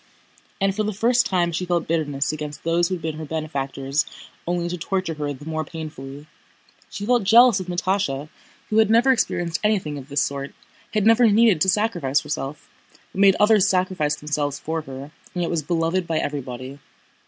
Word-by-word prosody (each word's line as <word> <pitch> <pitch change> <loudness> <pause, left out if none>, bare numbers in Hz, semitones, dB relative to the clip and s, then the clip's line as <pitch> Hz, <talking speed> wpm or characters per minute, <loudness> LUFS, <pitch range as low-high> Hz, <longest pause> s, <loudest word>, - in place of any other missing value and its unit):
And 195 -1 +1
for 215 - 0
the 215 0 -1
first 240 +4 +3
time 175 -2 +1
she 170 +2 -2
felt 175 -2 -1
bitterness 150 -3 0
against 150 -1 -6
those 170 +1 +2
who 185 - -2
had 170 - -10
been 160 -1 -3
her - - -5
benefactors 140 -2 -2 0.4
only 175 0 -1
to 175 - -3
torture 185 0 -2
her 150 -2 -3
the 145 +1 -9
more 155 0 -2
painfully; 150 -3 -8 0.6
she 200 +4 -6
felt 240 -1 +2
jealous 230 +1 +6
of 185 - -6
Natásha 175 -5 -1 0.4
who 215 - +4
had 220 -1 +4
never 235 +4 +5
experienced 175 -8 0
anything 185 -9 0
of 135 +1 -12
this 140 0 +1
sort, 140 0 -3 0.4
had 210 -2 +2
never 225 +2 +6
needed 210 -5 +4
to 190 - +4
sacrifice 185 -9 +1
herself, 150 -1 -5 0.4
but 195 - -2
made 195 -2 +6
others 210 -2 +5
sacrifice 185 -5 +1
themselves 150 -1 -2
for 160 +2 -3
her 135 0 -9 0.2
and 175 - 0
yet 170 - -2
was 170 -2 0
beloved 165 +3 0
by 160 - 0
everybody. 135 -2 -4
165 Hz, 190 wpm, -23 LUFS, 150-195 Hz, 0.6 s, jealous